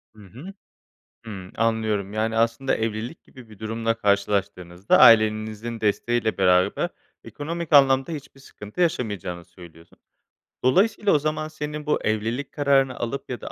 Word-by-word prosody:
Hı 105 Hz, -, -15 dB
hı. 135 Hz, -, -11 dB, 0.7 s
Hımm, 95 Hz, -5 st, -9 dB
anlıyorum. 110 Hz, -3 st, -1 dB
Yani, 110 Hz, +1 st, -1 dB
aslında 115 Hz, +4 st, +1 dB
evlilik 110 Hz, +7 st, -4 dB
gibi 130 Hz, -4 st, -16 dB
bir 105 Hz, -2 st, -15 dB
durumla 115 Hz, +1 st, -2 dB
karşılaştığınızda, 100 Hz, -3 st, 0 dB
ailenizin 110 Hz, 0 st, +4 dB
desteğiyle 110 Hz, +1 st, 0 dB
beraber 90 Hz, -1 st, +2 dB, 0.4 s
ekonomik 165 Hz, +2 st, -6 dB
anlamda 135 Hz, +1 st, +5 dB
hiçbir 140 Hz, -2 st, -9 dB
sıkıntı 105 Hz, -, -10 dB
yaşamayacağınızı 100 Hz, -, -2 dB
söylüyorsun. 85 Hz, -2 st, -16 dB, 0.7 s
Dolayısıyla 200 Hz, -, +2 dB
o 150 Hz, -, +4 dB
zaman 155 Hz, +1 st, -2 dB
senin 150 Hz, -1 st, -6 dB
bu 150 Hz, -, +1 dB
evlilik 115 Hz, +6 st, -2 dB
kararını 135 Hz, -2 st, +1 dB
alıp 135 Hz, +4 st, -4 dB
ya 125 Hz, -4 st, -5 dB
da -, -, -7 dB
115 Hz, 135 wpm, -23 LUFS, 105-140 Hz, 0.7 s, anlamda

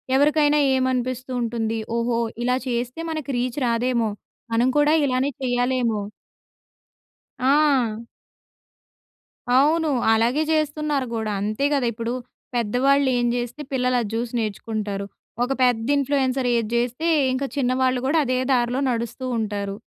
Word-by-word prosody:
ఎవరికైనా 295 Hz, +1 st, +4 dB, 0.2 s
ఏమనిపిస్తూ 255 Hz, 0 st, -1 dB
ఉంటుంది? 225 Hz, -1 st, -2 dB, 0.2 s
ఓహో! 235 Hz, 0 st, 0 dB, 0.2 s
ఇలా 250 Hz, +1 st, +2 dB
చేస్తే 245 Hz, +4 st, -2 dB
మనకు 305 Hz, -3 st, -4 dB
రీచ్ 250 Hz, +3 st, -2 dB
రాదేమో, 235 Hz, -1 st, +1 dB, 0.4 s
మనం 235 Hz, +2 st, +3 dB
కూడా 295 Hz, +1 st, +4 dB
ఇలానే 260 Hz, +1 st, 0 dB
చేయాలేమో. 245 Hz, -3 st, 0 dB, 1.4 s
ఆ! 260 Hz, -5 st, +2 dB, 1.5 s
అవును. 310 Hz, +4 st, +3 dB, 0.2 s
అలాగే 235 Hz, +6 st, +2 dB
చేస్తున్నారు 300 Hz, -2 st, 0 dB
గూడా 220 Hz, -1 st, -2 dB
అంతే 215 Hz, +7 st, -1 dB
గదా! 260 Hz, -4 st, +1 dB
ఇప్పుడు 230 Hz, +2 st, -3 dB, 0.4 s
పెద్దవాళ్ళు 260 Hz, +5 st, +2 dB
ఏం 240 Hz, 0 st, +1 dB
జేస్తే 245 Hz, +4 st, -4 dB
పిల్లలు 250 Hz, -1 st, +1 dB
అది 215 Hz, -, -4 dB
చూసి 235 Hz, +1 st, -3 dB
నేర్చుకుంటారు. 210 Hz, -2 st, -3 dB, 0.4 s
ఒక 250 Hz, -, -2 dB
పెద్ద 245 Hz, -2 st, +2 dB
ఇన్‌ఫ్లుయెన్సర్ 270 Hz, -2 st, 0 dB
ఏది 230 Hz, -2 st, 0 dB
జేస్తే, 245 Hz, +7 st, -1 dB, 0.2 s
ఇంక 260 Hz, +2 st, -1 dB
చిన్నవాళ్ళు 255 Hz, -1 st, +1 dB
కూడా 315 Hz, +4 st, +3 dB
అదే 255 Hz, 0 st, 0 dB, 0.2 s
దార్లో 245 Hz, +1 st, +1 dB
నడుస్తూ 235 Hz, +2 st, -4 dB
ఉంటారు. 200 Hz, -2 st, -3 dB
250 Hz, 120 wpm, -23 LUFS, 230-270 Hz, 1.5 s, ఎవరికైనా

